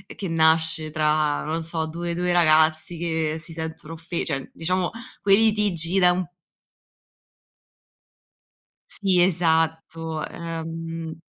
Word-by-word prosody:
che 195 - -5
nasce 160 -1 +3
tra, 150 -1 +1
non 160 +2 -3
so, 160 0 -3
due 170 +2 -4
2 180 +1 0
ragazzi 160 -1 +4
che 160 -2 -2
si 165 +1 -8
sentono 160 -1 -6
offe 165 +1 -4
cioè 135 -4 -3
diciamo, 180 +2 -1 0.3
quelli 205 +3 +5
litigi 190 -3 0
da 180 -1 +5
un 185 +1 -1 2.7
Sì, 190 -3 +3
esatto, 160 -2 0
ehm 165 -1 -6
165 Hz, 110 wpm, -23 LUFS, 160-175 Hz, 2.7 s, quelli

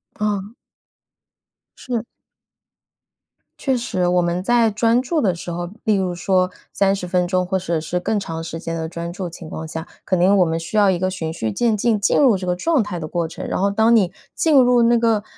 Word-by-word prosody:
啊。 210 0 -2 1.3
是。 245 -3 -2 1.6
确 265 -2 +1
实， 200 -7 -1
我 180 0 +2
们 175 +1 -1
在 230 +3 +3
专 230 +3 +2
注 315 +4 0
的 195 -8 +1
时 170 +1 -7
候， 175 0 -4
例 215 -2 +2
如 185 -2 -1
说 185 +1 +1 0.2
30 195 -2 0
分 180 0 +1
钟 185 0 +1
或者 180 -3 -1
是 165 +3 -2
更 210 +4 -1
长 165 -4 -5
时 165 0 -6
间 165 0 -4
的 160 -1 -3
专 170 +1 -5
注 185 -1 -5
情 165 -1 -10
况 160 - -6
下， 160 +1 -6 0.2
肯 185 -2 +1
定 190 +3 +5
我 185 - +5
们 165 0 -1
需 165 +6 -5
要 205 -1 +5
一 185 - +1
个 185 +2 -1
循 165 -4 -4
序 110 -9 -3
渐 230 - +1
进 220 +1 +1
进 200 - +2
入 255 -8 +5
这 185 - -6
个 180 - +1
状 280 - +1
态 180 -4 -5
的 155 - -5
过 170 +1 -1
程。 160 - -8
然 - - -2
后 200 - +3
当 220 +3 +4
你 190 -5 +2 0.2
进 320 -2 +2
入 250 -3 +5
那 235 +1 +4
个， 225 -3 +1
185 Hz, 230 characters per minute, -20 LUFS, 175-220 Hz, 1.6 s, 定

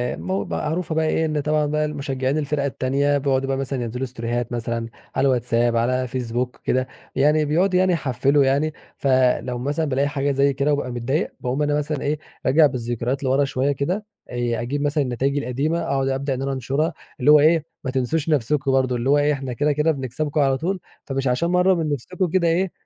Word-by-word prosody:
م 95 +4 -3
معروفة 160 +1 -2
بقى 160 0 +2
إيه، 160 +1 +1
إن 155 -1 -1
طبعًا 150 +1 +1
بقى 150 +1 0
المشجعين 140 -1 -2
الفِرَق 150 -1 -1
التانية 140 +1 +1
بيقعدوا 135 -1 0
بقى 135 0 0
مثلًا 135 -1 -2
ينزلوا 125 +3 -3
ستوريهات 120 -1 -3
مثلًا 115 -1 -2 0.3
على - - +2
الواتساب، 120 -2 +1
على 125 +2 +1
فيسبوك 125 0 -3
وكده، 130 0 -1 0.3
يعني 150 +3 +3
بيقعدوا 180 +5 +2
يعني 185 -1 +3
يحفِّلوا 140 -1 +2
يعني، 145 +4 +1 0.2
فلو 130 -2 +2
مثلًا 145 +6 -1
بالاقي 140 0 +1
حاجة 140 0 -1
زي 140 +1 +2
كده 140 +2 +1
وبابقى 140 -3 -2
متضايق 120 +6 -1
باقوم 130 +4 -2
أنا 145 0 +1
مثلًا 150 -1 -2
إيه، 150 +1 -1 0.3
راجع 150 +4 +5
بالذكريات 120 0 -2
لورا 135 +2 +2
شوية 135 +1 0
كده، 175 +10 -2 0.2
آآ 120 -1 -1
أجيب 140 +4 -2
مثلًا 145 0 +1
النتايج 135 +3 -1
القديمة 140 +6 -1
أقعد 135 -4 0
أبدأ 135 +1 -1
إن 130 - -4
أنا 135 0 -1
أنشرها 135 +5 -1 0.3
اللي 145 +4 +5
هو 150 - +8
إيه 160 +1 +4 0.2
ما 130 - -2
تنسوش 135 +5 -1
نفسكم 140 0 +1
برضه، 130 -1 +2
اللي 120 +2 -1
هو 145 - +5
إيه 145 +1 +3
إحنا 135 -3 -4
كده، 145 +5 +1
كده 150 +2 +2
بنكسبكم 145 +2 -2
على 135 -1 +2
طول، 185 +6 -2 0.3
فمش 135 -1 -2
عشان 125 +8 +1
مرّة 180 +1 +4
من 165 -4 -1
نفسكم 180 +8 -2
كده 170 0 +2
إيه، 175 +2 +1
140 Hz, 200 wpm, -22 LUFS, 130-150 Hz, 0.3 s, هو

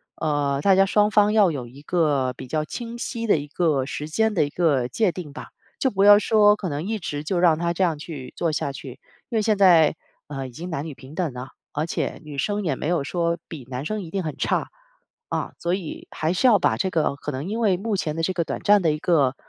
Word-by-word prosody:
呃， 145 -2 0
大 195 - +5
家 195 +1 +5
双 210 +2 +2
方 210 0 +4
要 205 -5 +5
有 130 -5 -5
一 135 +4 -14
个 145 -6 +1
比 130 - -8
较 155 +4 -1
清 235 +9 -6
晰 230 -1 -4
的 - - +5
一 145 - -4
个 155 -6 +1
时 150 +2 -5
间 220 +7 +1
的 165 -7 +2
一 145 - -5
个 145 -6 +1
界 195 - +1
定 160 -4 -8
吧。 - - -9 0.3
就 265 - +2
不 195 0 +1
要 205 0 +9
说 210 -1 +5
可 190 -4 -4
能 150 +5 -4
一 220 - -1
直 145 -3 -4
就 175 +2 0
让 170 -3 +4
他 170 0 0
这 185 - 0
样 165 -4 +1
去 145 -5 -8
做 165 - 0
下 140 -2 -1
去， 135 -2 -9 0.3
因 240 - -4
为 220 - +3
现 215 -1 +1
在， 170 -6 +6 0.3
呃， 135 -2 -5
已 - - -11
经 170 +8 -7
男 160 -3 -3
女 155 - -6
平 130 +2 -13
等 170 -7 -2
了， 125 +1 -7 0.2
而 150 +2 -1
且 170 - -3
女 150 -2 -9
生 205 +8 -1
也 155 -7 0
没 - - -3
有 170 -4 +1
说 170 +2 -1
比 145 -7 -8
男 130 +1 -4
生 215 +7 -3
一 170 - -8
定 195 -2 -2
很 155 -2 -5
差。 - - 0 0.6
啊， - - -3
所 170 +1 -1
以 185 -5 -5
还 160 +2 -1
是 185 - 0
要 225 -5 +6
把 - - +1
这 190 - -1
个 160 -4 +1
可 150 +1 -5
能 140 +8 -5
因 225 - -2
为 205 -6 +2
目 210 +2 -2
前 155 -4 -2
的 165 - -2
这 175 +3 0
个 170 -2 0
短 - - -4
暂 205 -1 +5
的 160 - +3
一 150 - -3
个， 145 -7 +2
165 Hz, 280 characters per minute, -23 LUFS, 145-195 Hz, 0.6 s, 要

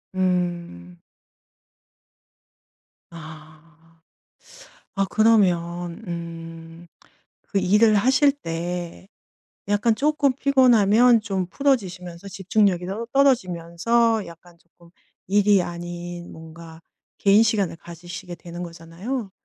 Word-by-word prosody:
음. 175 - -2 2.1
아. 160 0 -15 0.9
아 195 -1 +1
그러면 175 -4 +1
음 165 0 -8 0.6
그 200 - 0
일을 210 +4 +4
하실 260 +7 +4
때 175 - -6 0.6
약간 205 +3 +2
쪼끔 290 +1 +1
피곤하면 245 -4 +4
좀 195 -4 -3
풀어지시면서 190 -8 -2
집중력이 195 -1 0
떨 210 +5 -5
떨어지면서 225 -2 +1
약간 170 +1 -15
조끔 170 0 -23 0.4
일이 205 0 +3
아닌 175 0 -7
뭔가 160 0 -12 0.4
개인 200 +2 +5
시간을 210 -6 0
가지시게 175 +1 -10
되는 175 0 -9
거잖아요. 175 +8 -6
180 Hz, 195 characters per minute, -23 LUFS, 170-215 Hz, 2.1 s, 개인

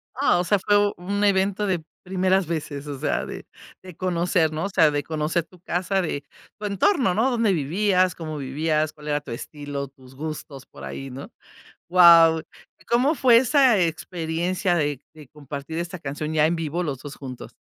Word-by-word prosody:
Ah, 265 -9 +3
o - - +1
sea 205 +3 +2
fue 205 +2 +3
u - - -7
un 200 +4 -2
evento 200 +1 +2
de 180 -5 -1 0.2
primeras 190 0 +1
veces, 150 -3 -4
o 140 -2 -6
sea, - - -1
de - - -8 0.4
de 185 -2 -12
conocer, 175 -2 +1
¿no? 155 +3 -3
O - - -2
sea, 160 -5 +4
de 145 0 -1
conocer 155 +3 -1
tu 180 - -20
casa, 185 +3 -1
de 150 -5 -3 0.4
tu 210 - -5
entorno, 210 - +2
¿no? 240 +5 +2
Dónde 230 -4 +2
vivías, 185 +4 +1
cómo 155 -2 -6
vivías, 155 +3 -1
cuál 150 -1 -13
era 150 0 0
tu 145 - -10
estilo, 145 +3 -6
tus 130 -1 -18
gustos 145 -2 -7
por - - -14
ahí, 135 0 -6
¿no? 135 +2 -9 0.6
Guau. 165 -2 +7 0.5
¿Cómo 255 +6 +3
fue 250 -5 +5
esa 260 -2 +4
experiencia 175 +2 -1
de 145 -5 -1
de 150 -4 -14
compartir 145 +2 -7
esta 175 +1 -4
canción 150 0 -4
ya 155 -1 +4
en 170 +2 0
vivo 165 +2 -2
los 145 -6 -3
2 145 +2 -9
juntos? 130 -3 -9
165 Hz, 185 wpm, -24 LUFS, 150-190 Hz, 0.6 s, Guau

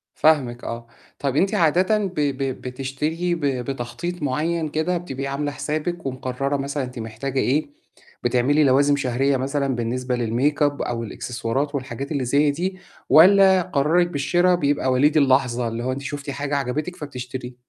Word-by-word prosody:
فاهمِك 130 -6 +2
آه، 115 0 -6 0.3
طَب 140 -1 -1
أنتِ 190 +6 +2
عادةً 185 +4 +3
ب 195 -3 -2
ب 135 -2 -1
بتشتري 145 +7 -2
ب 160 - -3
بتخطيط 135 +5 -3
معيّن 155 +4 -1
كده، 160 +4 0
بتبقي 135 -6 -5
عاملة 145 +1 -2
حسابِك 155 +4 -3
ومقررة 130 +1 -2
مثلًا 140 +1 -3
أنتِ 125 -1 -7
محتاجة 115 +5 -4
إيه، 145 +4 +1 0.6
بتعملي 125 +5 +3
لوازم 140 +1 +4
شهرية 135 0 +1
مثلًا 135 0 -1
بالنسبة 125 +2 -2
للmakeup 140 +5 0
أو 115 -1 -3
الإكسسوارات 125 +6 -3
والحاجات 135 +1 -5
اللي 140 -4 -1
زي 145 +4 +3
دي؟ 185 +5 -3 0.3
والّا 190 +3 +7
قرارِك 170 +1 +2
بالشرا 175 +4 +2
بيبقى 145 -5 +1
وليد 145 +5 +3
اللحظة 130 -4 +2
اللي 115 +1 -4
هو 130 - -1
أنتِ 135 +2 -4
شُفتِ 145 0 -6
حاجة 145 +1 -2
عجبِتِك 145 +7 -2
فبتشتري؟ 125 -3 -7
140 Hz, 155 wpm, -22 LUFS, 130-155 Hz, 0.6 s, والّا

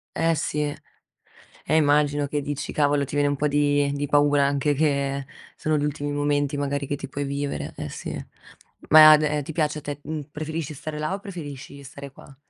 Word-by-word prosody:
Eh, 165 0 +2
sì, 150 0 -2 1.1
e 155 - +2
immagino 145 -1 +3
che 145 0 -2
dici: 145 0 -4
"Cavolo!", 145 -1 +2
ti 145 - -8
viene 145 0 +2
un 145 - -1
po' 150 +2 0
di 145 0 +2
di 145 0 -2
paura 145 0 +3
anche 140 +1 +1
che 140 -2 0 0.3
sono 155 -1 0
gli 145 - -1
ultimi 145 0 -2
momenti, 145 0 0
magari, 140 0 -2
che 145 - -2
ti 145 - -7
puoi 140 +2 -4
vivere. 140 0 -3
Eh, - - -4
sì. - - -6 0.8
Ma 155 0 +10
d 150 -1 0
ti 160 - -6
piace 155 -1 0
a 150 - -6
te, 145 0 -6
mhmm 155 -1 -6
preferisci 155 0 -4
stare 150 +2 -6
là 155 +4 -2
o 195 - -3
preferisci 145 -8 -8
stare 140 +1 -10
qua? 135 0 -15
145 Hz, 195 wpm, -24 LUFS, 140-150 Hz, 1.1 s, Ma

